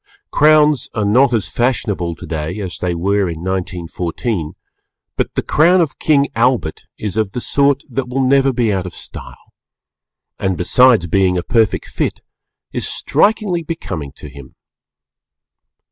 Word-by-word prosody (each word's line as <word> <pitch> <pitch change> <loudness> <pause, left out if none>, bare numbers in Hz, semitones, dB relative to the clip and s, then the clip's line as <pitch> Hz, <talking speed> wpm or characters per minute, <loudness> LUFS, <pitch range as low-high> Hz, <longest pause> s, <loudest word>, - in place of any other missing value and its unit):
Crowns 150 -3 +4
are 105 -2 0
not 125 +6 +4
as 115 -4 0
fashionable 105 -8 -1
today 80 +4 -5
as 95 -4 -5
they 90 -1 -1
were 100 +2 0
in 80 0 -6
1914, 90 0 -3 0.6
but - - -2
the - - 0
Crown 175 +5 +4
of 160 -4 -1
King 140 -2 +3
Albert 115 -9 0
is 105 -1 -4
of 110 -3 0
the - - -2
sort 140 +2 +1
that 130 -1 -3
will 135 +1 0
never 135 +1 +3
be 115 -4 0
out 95 -1 -2
of 85 - -9
style, - - -11 0.9
and 95 -2 -1
besides 120 +1 +4
being 90 +1 +2
a 90 - -2
perfect 110 -3 +1
fit, - - -3 0.5
is - - -2
strikingly 205 -4 +1
becoming 100 - -5
to - - -11
him. 70 -1 -13
110 Hz, 145 wpm, -17 LUFS, 90-135 Hz, 0.9 s, Crowns